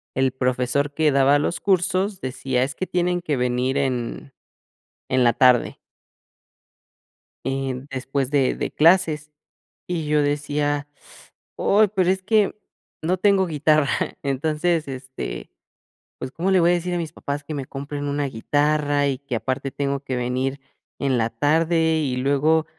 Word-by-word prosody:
el 130 -1 +2
profesor 130 +2 0
que 155 -1 +2
daba 140 +1 +4
los 170 +3 -2
cursos 190 +1 +1
decía: 130 -2 -1
"Es 140 +2 -3
que 185 - -3
tienen 180 0 0
que 150 -6 -1
venir 125 +2 0
en 130 0 -2 0.8
en 130 -1 +2
la 120 - +5
tarde". 125 0 +3 1.7
En 135 0 -3
después 135 0 -2
de 140 -3 +2
de - - -3
clases, 155 -2 +3 0.6
y 165 -4 -3
yo 150 0 +2
decía: 145 0 -1 0.7
"Uy, 210 +1 +3
pero 185 -2 +3
es 190 0 0
que, 210 0 +2 0.5
no 180 +3 0
tengo 195 -1 +3
guitarra". 155 -2 +2 0.3
Entonces, 155 +4 0
este, 130 - -6 0.7
pues, 130 - -5
¿cómo 180 +6 -2
le 190 - +5
voy 170 - +4
a - - +4
decir 175 +1 -2
a - - 0
mis 160 -2 -5
papás 145 +1 -5
que 155 - -6
me 135 - -4
compren 145 +1 -5
una 145 0 -1
guitarra 145 +3 +1
y 135 -2 -2
que 140 -4 -5
aparte 130 +4 -2
tengo 140 0 -2
que 135 -2 -3
venir 130 +3 -2 0.4
en 135 -3 +1
la 115 0 +1
tarde?, 160 +5 +2
y 130 -4 -1
luego, 145 +4 +2
145 Hz, 155 wpm, -23 LUFS, 130-160 Hz, 1.7 s, la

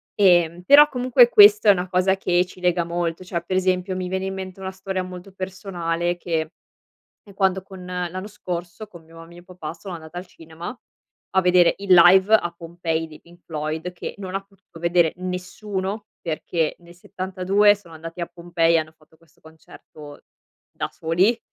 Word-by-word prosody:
Ehm, 175 -3 +3
però 290 +7 +7
comunque 250 -2 +4
questo 210 -1 +7
è - - +11
una 180 -1 -1
cosa 185 +1 +1
che 180 -1 +1
ci 185 - -15
lega 180 -1 +1
molto, 170 0 -3
cioè 175 -2 -4
per 185 +2 -3
esempio 185 0 0
mi 185 -1 -4
viene 190 +1 -2
in 190 - -3
mente 190 0 -7
una 190 0 -5
storia 190 0 -4
molto 180 +1 -10
personale 175 -3 -3
che 165 -2 -1 0.8
è 200 -3 -17
quando 190 -1 +1
con 190 -1 -12
l'anno 180 +1 -4
scorso 180 -1 -6
con 175 -5 -15
mio 165 +1 -14
mio 175 +1 -14
papà 180 -4 -8
sono 185 +2 -9
andata 160 0 -11
al 180 - -5
cinema 165 +5 -9 0.6
a 190 - +5
vedere 180 -1 +4
il 200 -2 0
live 185 +4 +7
a 175 -5 +3
Pompei 165 -1 -3
dei 155 -1 -14
Pink 175 +1 -20
Floyd 155 +2 -4
che 175 - -7
non 190 -2 -7
ha 195 - -2
potuto 195 -4 -19
vedere 170 -1 +2
nessuno 190 +3 -5 0.2
perché 165 -1 -2
nel 175 0 -17
'72 190 +3 +1
sono 195 -5 -16
andati 165 +2 -8
a 170 - -2
Pompei 170 -1 0
e - - +4
hanno 155 0 -4
fatto 160 0 -26
questo 165 -2 -28
concerto, 155 -2 -14 0.5
da - - -4
soli. 180 +8 +1
180 Hz, 180 wpm, -22 LUFS, 170-190 Hz, 0.8 s, è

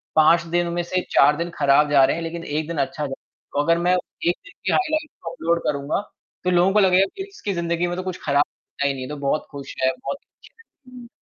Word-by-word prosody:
5 160 +2 +6
दिनों 175 -1 +1
में 175 0 -1
से 185 +2 -1
4 145 +2 +5
दिन 170 +1 -2
खराब 145 +1 +4
जा 140 -2 +6
रहे - - +1
हैं 170 - -4
लेकिन 165 +1 -5
1 150 0 -2
दिन 170 -2 -4
अच्छा 150 +2 -1
जा 135 - -5 0.4
को 145 - +2
अगर 170 +2 +3
मैं 175 +1 +3
1 175 -1 -1
दिन 400 - -13
की - - +2
हाइलाइट्स 310 -3 0 0.2
अपलोड 170 0 0
करूँगा, 140 +4 -1 0.4
तो 180 - +1
लोगों 180 +2 +4
को 210 - +5
लगेगा 190 -1 +5
कि 385 - -4
इसकी 210 - -4
ज़िंदगी 170 0 -1
में 175 - -2
तो 185 - -3
कुछ 185 -1 -5
खराब 140 0 +4
होता 140 - -5
ही 140 - +1
नहीं, 130 -1 -6
ये 130 - -7
तो 150 - -5
बहुत 140 +2 -1
खुश 140 -2 -8
है, 130 - +4
बहुत 275 - -3
खुश - - -22
है, 455 - -19 0.3
हुँ। 245 -1 -10
170 Hz, 250 wpm, -23 LUFS, 145-180 Hz, 0.4 s, 5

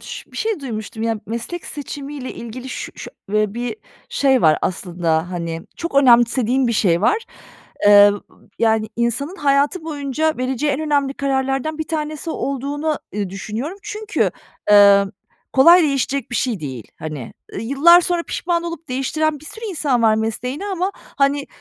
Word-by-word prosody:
ş - - -9
bir - - -11
şey 440 -7 -1
duymuştum, 220 -3 -5
ya. 225 -1 -1
Meslek 235 - -5
seçimiyle 285 -2 -6
ilgili 245 +3 -8
ş - - -6
şö - - -8 0.2
eee, 215 0 +1
bir 245 - -3 0.3
şey 265 -3 +2
var 155 -1 +5
aslında, 175 -2 -1
hani, 170 -2 -4
çok 335 -3 -5
önemsediğim 250 -1 +4
bir 235 - +1
şey 175 -6 +2
var. 435 - +2 0.6
Eee, 205 0 +9 0.5
yani, 220 -1 +2
insanın 240 - -1
hayatı 290 +3 +1
boyunca 305 0 -1
vereceği 260 +3 0
en 280 - -2
önemli 285 -3 0
kararlardan 270 +2 -1
bir 315 - -4
tanesi 310 0 -3
olduğunu, 285 +3 -2 0.2
ııı, 200 -3 -2
düşünüyorum. 225 - -5
Çünkü, 425 0 -1 0.4
eee, 200 -1 +7 0.5
kolay 340 +7 +7
değişecek 275 -3 -1
bir 245 - -1
şey 230 -9 -1
değil, 130 -6 -6
hani. 150 -6 -6 0.3
Yıllar 280 +9 +6
sonra 350 -1 0
pişman 340 0 -1
olup 335 -2 -6
değiştiren 295 +3 -1
bir - - -14
sürü 440 +7 -8
insan 290 - 0
var 220 -1 +5
mesleğini 250 - -3
ama, 380 0 -1
hani, 280 0 -1
270 Hz, 155 wpm, -20 LUFS, 220-310 Hz, 0.6 s, Eee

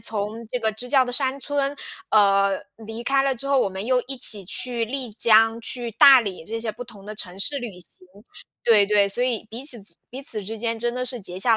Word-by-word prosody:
从 220 +1 -4
这 250 - -2
个 220 -2 -1
支 245 +4 -6
教 265 -1 +4
的 245 - -5
山 265 +1 0
村， 285 0 -2 0.3
呃， 200 -2 +3 0.2
离 225 +1 -7
开 275 +1 +2
了 270 -1 +1
之 275 +3 -5
后， 275 -1 +2
我 225 - +2
们 190 +2 -6
又 255 +1 +2
一 270 0 -2
起 205 -6 +1
去 240 +3 -1
丽 255 -1 -4
江、 225 +1 +4
去 240 0 -3
大 260 +4 +8
理 190 -6 -6
这 225 +1 -4
些 225 -1 -3
不 245 - -8
同 215 -5 -14
的 215 - -7
城 190 -3 -5
市 280 +8 +1
旅 225 -8 -7
行。 180 +1 -11 0.6
对， 215 -3 +6
对， 205 -1 +3
所 240 +5 0
以 235 -4 -2
彼 235 +4 -7
此 245 -7 -1
之 170 -4 -7
彼 260 - -7
此 220 -7 -1
之 220 +3 -6
间 230 0 -2
真 240 +1 -2
的 250 - -2
是 255 -1 -3
结 185 -3 -7
下 225 +3 +4
230 Hz, 260 characters per minute, -23 LUFS, 210-250 Hz, 0.6 s, 大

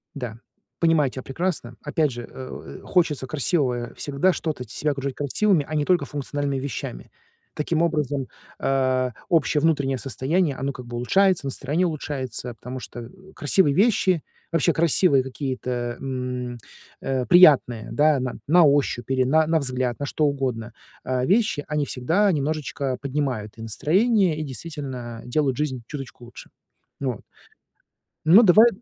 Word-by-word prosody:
Да, 120 -5 -6 0.4
понимаю 165 -4 +3
тя 130 - -6
прекрасно. 135 -4 -3
Опять 150 -1 +1
же, 120 0 -6
э, 130 -1 -9
у, - - -7
э, - - -10
хочется 155 -7 +1
красивого 130 -4 0
всегда 145 +6 +1
что-то 155 -7 -3
себя 150 +6 -1
окружать 140 -1 -4
красивыми, 155 +3 +1
а 155 - -4
не 150 -1 +1
только 175 -6 +2
функциональными 145 0 -3
вещами. 110 - -6 0.4
Таким 160 +2 -1
образом, 150 -5 0 0.3
а 130 -2 +1 0.2
общее 160 -3 +3
внутреннее 140 -5 +1
состояние 135 - 0
оно 135 +2 -2
как 125 -2 -10
бы 120 - -7
улучшается, 185 +7 +2
настроение 145 +6 -1
улучшается, 130 -6 -4
потому 125 +3 -7
что, 120 - -9
э, 115 - -9 0.3
красивые 145 0 +3
вещи, 190 -5 +3 0.3
вообще 165 -4 +2
красивые 160 -4 +3
какие-то, 125 -3 -4
м, 125 -2 -4 0.4
э, 130 -2 -1
приятные, 140 -10 +5
да, 150 -1 +3
на 125 -1 -3
на 175 +3 +6
ощупь 140 -3 +1
или 130 -1 +3
на 155 +4 +3
на 160 0 +3
взгляд, 130 -3 -2
на 145 - -2
что 155 - 0
угодно 125 -5 -2 0.3
а 130 0 -1
вещи, 200 - +2
они 150 -2 0
всегда 170 +12 +1
немножечко 145 -3 -2
поднимают 130 -7 -3
и 115 - -9
настроение 185 - +2
и 155 - -2
действительно 130 -5 -6
делают 135 0 0
жизнь 130 -5 -2
чуточку 135 -4 -8
лучше 120 - -12 0.5
вот. 130 -6 -2 1.1
Ну 190 +9 +8
давай 215 +5 +7
140 Hz, 150 wpm, -24 LUFS, 125-155 Hz, 1.1 s, Ну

